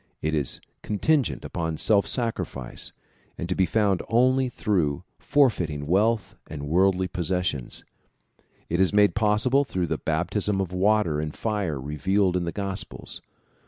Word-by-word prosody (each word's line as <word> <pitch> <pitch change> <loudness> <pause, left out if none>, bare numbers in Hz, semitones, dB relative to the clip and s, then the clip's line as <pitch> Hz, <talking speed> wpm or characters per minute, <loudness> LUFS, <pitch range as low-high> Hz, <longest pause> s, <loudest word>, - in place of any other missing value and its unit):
It 80 +1 -2
is 75 -4 0 0.2
contingent 135 +6 0
upon 80 -3 -3
self 100 +2 +3
sacrifice, 115 - -2 0.5
and 85 - -4
to 90 - 0
be 95 0 +2
found 100 -2 +2
only 130 +3 +3
through 85 - 0 0.2
for 145 -1 +4
feiting 80 - -3
wealth 100 +3 +1
and 75 -2 -6
worldly 95 +3 +3
possessions. 90 -7 -2 0.8
It 85 - -1
is 95 - +4
made 105 0 +5
possible 110 +6 +3
through 95 -9 -2
the - - -2
baptism 95 +5 0
of 95 -2 -2
water 95 -4 +2
and 75 0 -4
fire 100 -10 -2
revealed 90 +7 0
in 90 -1 0
the 85 - -2
gospels. 100 0 -5
95 Hz, 145 wpm, -25 LUFS, 80-105 Hz, 0.8 s, made